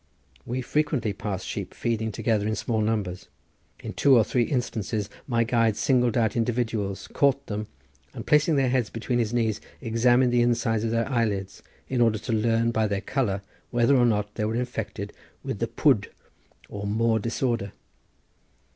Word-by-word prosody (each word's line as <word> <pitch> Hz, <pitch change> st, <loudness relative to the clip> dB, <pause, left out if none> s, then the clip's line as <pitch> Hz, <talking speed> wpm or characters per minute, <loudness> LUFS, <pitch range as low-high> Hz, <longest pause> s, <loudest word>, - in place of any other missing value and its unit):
We 125 Hz, +2 st, -2 dB
frequently 135 Hz, -6 st, 0 dB
passed 100 Hz, -1 st, -4 dB
sheep -, -, -5 dB
feeding 110 Hz, -1 st, -1 dB
together 105 Hz, -1 st, 0 dB
in 110 Hz, -, 0 dB
small 110 Hz, -1 st, -1 dB
numbers. 105 Hz, -5 st, -2 dB, 0.5 s
In -, -, -6 dB
two 135 Hz, -3 st, +5 dB
or 115 Hz, -, +6 dB
three 120 Hz, +3 st, 0 dB
instances 110 Hz, -5 st, -2 dB, 0.2 s
my 115 Hz, -3 st, +2 dB
guide 115 Hz, -2 st, +2 dB
singled 125 Hz, -4 st, +2 dB
out 110 Hz, -3 st, +1 dB
individuals, 115 Hz, -4 st, -1 dB
caught 140 Hz, -1 st, +2 dB
them, 105 Hz, 0 st, -4 dB, 0.4 s
and -, -, -8 dB
placing 150 Hz, +1 st, +4 dB
their 135 Hz, -2 st, +2 dB
heads 125 Hz, -4 st, +1 dB
between 120 Hz, +2 st, -2 dB
his 115 Hz, -2 st, 0 dB
knees 115 Hz, -3 st, 0 dB, 0.2 s
examined 120 Hz, +1 st, +3 dB
the 120 Hz, -, +4 dB
inside 115 Hz, -2 st, +1 dB
of 115 Hz, -, 0 dB
their 115 Hz, 0 st, 0 dB
eyelids, 105 Hz, -7 st, -1 dB, 0.3 s
in 125 Hz, -2 st, 0 dB
order 115 Hz, -2 st, +3 dB
to 115 Hz, -, -4 dB
learn 115 Hz, +1 st, +2 dB
by 110 Hz, -1 st, +1 dB
their 100 Hz, -1 st, -1 dB
colour 105 Hz, -7 st, -1 dB, 0.3 s
whether 120 Hz, +3 st, +3 dB
or 120 Hz, -2 st, +5 dB
not 105 Hz, -2 st, 0 dB
they 105 Hz, -, -2 dB
were 110 Hz, +1 st, -1 dB
infected 120 Hz, 0 st, -4 dB, 0.3 s
with -, -, -4 dB
the -, -, 0 dB
pwd -, -, +2 dB, 0.6 s
or 100 Hz, 0 st, -5 dB
moor 110 Hz, +2 st, +2 dB
disorder. 115 Hz, -2 st, -1 dB
115 Hz, 170 wpm, -26 LUFS, 110-120 Hz, 0.6 s, or